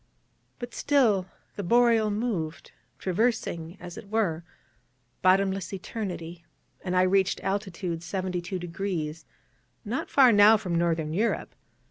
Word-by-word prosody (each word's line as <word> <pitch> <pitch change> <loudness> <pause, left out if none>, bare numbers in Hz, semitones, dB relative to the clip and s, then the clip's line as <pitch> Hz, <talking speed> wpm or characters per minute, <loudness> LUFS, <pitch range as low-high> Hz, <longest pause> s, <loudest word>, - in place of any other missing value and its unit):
But 240 -1 -7
still 225 -10 +2 0.3
the - - -4
Boreal 230 +2 +4
moved, 205 -8 -3 0.3
traversing, 185 - -1
as 175 -1 -8
it 200 - -13
were, 195 -7 0 0.8
bottomless 190 0 +2
Eternity: 175 -4 -6 0.4
and 185 -1 -2
I 180 - +5
reached 190 0 +2
latitude 190 -3 -2
72°, 175 -2 -4 0.6
not 235 +6 -3
far 265 -3 +6
now 210 +1 +7
from 185 -5 -4
Northern 165 -2 0
Europe. 220 +6 -1
190 Hz, 110 wpm, -27 LUFS, 170-215 Hz, 0.8 s, now